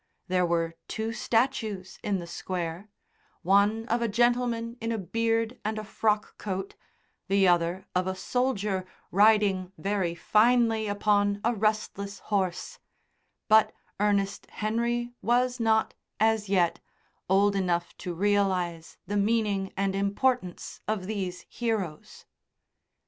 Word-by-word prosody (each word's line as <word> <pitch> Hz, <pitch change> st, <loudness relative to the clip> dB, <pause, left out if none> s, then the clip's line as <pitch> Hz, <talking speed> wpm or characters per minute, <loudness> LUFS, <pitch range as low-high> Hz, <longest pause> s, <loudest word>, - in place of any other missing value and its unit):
There 180 Hz, -1 st, +2 dB
were 165 Hz, -1 st, 0 dB
two 220 Hz, +1 st, -3 dB
statues 225 Hz, -6 st, -1 dB
in 205 Hz, -2 st, 0 dB
the 175 Hz, -, -6 dB
Square 175 Hz, +2 st, -5 dB, 0.5 s
one 200 Hz, +4 st, +3 dB
of 235 Hz, 0 st, 0 dB
a 235 Hz, -, +1 dB
gentleman 235 Hz, +1 st, +1 dB
in 230 Hz, +1 st, -2 dB
a 225 Hz, -, -1 dB
beard 230 Hz, +4 st, -1 dB
and 215 Hz, +1 st, -2 dB
a 215 Hz, -, -4 dB
frock 210 Hz, 0 st, -1 dB
coat, 190 Hz, -1 st, -4 dB, 0.5 s
the 195 Hz, -1 st, +4 dB
other 175 Hz, +1 st, +2 dB
of 180 Hz, 0 st, +1 dB
a 190 Hz, -, -1 dB
soldier 210 Hz, -3 st, -1 dB, 0.3 s
riding 200 Hz, -2 st, +3 dB
very 195 Hz, -4 st, -1 dB
finely 225 Hz, +3 st, +3 dB
upon 205 Hz, 0 st, +2 dB
a 235 Hz, -, +2 dB
restless 210 Hz, -2 st, -1 dB, 0.2 s
horse; 190 Hz, -3 st, -1 dB, 0.7 s
but 220 Hz, 0 st, +5 dB, 0.3 s
Ernest 200 Hz, -1 st, 0 dB
Henry 235 Hz, +3 st, -1 dB
was 245 Hz, +2 st, +1 dB
not, 220 Hz, -1 st, +2 dB, 0.3 s
as 220 Hz, -2 st, +2 dB
yet, 175 Hz, -4 st, +2 dB, 0.5 s
old 200 Hz, +1 st, +4 dB
enough 175 Hz, -3 st, -1 dB
to 180 Hz, -2 st, -5 dB
realise 185 Hz, -4 st, 0 dB
the 205 Hz, -, -2 dB
meaning 205 Hz, -2 st, +1 dB
and 195 Hz, 0 st, 0 dB
importance 200 Hz, 0 st, -1 dB
of 215 Hz, -4 st, -1 dB
these 190 Hz, -3 st, -4 dB
heroes. 210 Hz, -10 st, -4 dB
205 Hz, 125 wpm, -28 LUFS, 190-225 Hz, 0.7 s, but